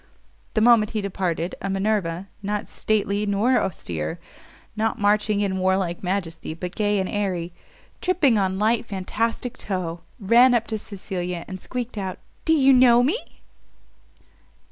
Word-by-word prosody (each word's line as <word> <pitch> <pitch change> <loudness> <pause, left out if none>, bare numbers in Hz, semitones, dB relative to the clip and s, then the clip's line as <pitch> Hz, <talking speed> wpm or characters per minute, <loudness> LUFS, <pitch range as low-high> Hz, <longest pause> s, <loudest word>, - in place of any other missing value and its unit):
The 215 - +3
moment 225 -2 +5
he 215 - 0
departed 180 -3 -2
a 195 - -3
Minerva, 195 -3 -1
not 205 +1 -3
stately 205 -1 0
nor 210 +6 +3
austere, 80 - -4 0.6
not 220 +1 0
marching 210 0 +2
in 190 -2 0
warlike 185 -2 0
majesty, 175 -4 -3
but 180 +2 -6
gay 205 -1 +1
and 190 - -1
airy, 185 -5 -2 0.5
"Tripping 330 -9 +3
on 190 -2 +1
light 220 +3 +2
fantastic 225 +4 -3
toe," 180 -4 -3 0.2
ran 240 +5 +5
up 230 -1 +1
to 220 -1 -2
Cecilia, 180 -4 -5
and 185 -1 -7
squeaked 245 -3 -4
out, 190 -2 -4 0.3
"Do 320 - +4
you 275 -3 +5
know 245 -1 +6
me?" 335 - -3
205 Hz, 145 wpm, -23 LUFS, 185-225 Hz, 0.6 s, know